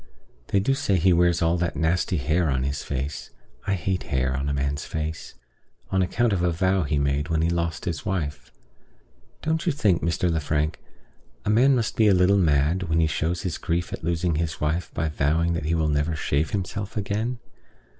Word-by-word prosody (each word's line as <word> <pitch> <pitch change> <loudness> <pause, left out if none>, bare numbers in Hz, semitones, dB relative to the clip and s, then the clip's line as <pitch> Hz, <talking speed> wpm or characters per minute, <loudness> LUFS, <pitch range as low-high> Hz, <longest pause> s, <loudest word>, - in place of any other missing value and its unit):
They 100 - +2
do 120 +8 +2
say 135 -8 +1
he 90 +1 +4
wears 85 0 +3
all 85 +1 +2
that 85 0 -1
nasty 85 +2 +1
hair 80 +4 +1
on 65 -2 0
his 70 +1 -2
face 70 +2 -4 0.4
(I 100 - +2
hate 90 +1 -1
hair 65 -1 -1
on 70 +2 -2
a - - 0
man's 70 +1 -1
face) 80 0 -5 0.6
on 95 - +2
account 115 +5 +1
of 90 - 0
a 90 - +2
vow 95 +2 +1
he 75 -1 0
made 70 +2 0
when 80 -1 +1
he 85 - +2
lost 85 -1 -2
his 85 -4 -3
wife. 80 -6 -3 0.9
Don't 160 +1 0
you - - +4
think, 105 - +2
Mr. 85 +1 0
Lefrank, 75 -1 0 0.7
a 105 - +2
man 130 +5 +5
must 115 -3 -1
be 110 - +5
a 100 - +5
little 95 +2 +4
mad 80 +1 +2
who 80 -2 +1
shows 80 +3 -1
his 85 -4 -3
grief 85 0 -2
at - - -6
losing 85 0 0
his 80 -1 -2
wife 80 +4 -1
by 80 - 0
vowing 80 +3 +1
that 85 -2 -3
he 80 +2 +1
will 80 -2 +1
never 75 +2 0
shave 75 +1 0
himself 100 +2 -4
again? 110 +5 -2
85 Hz, 200 wpm, -25 LUFS, 75-95 Hz, 0.9 s, man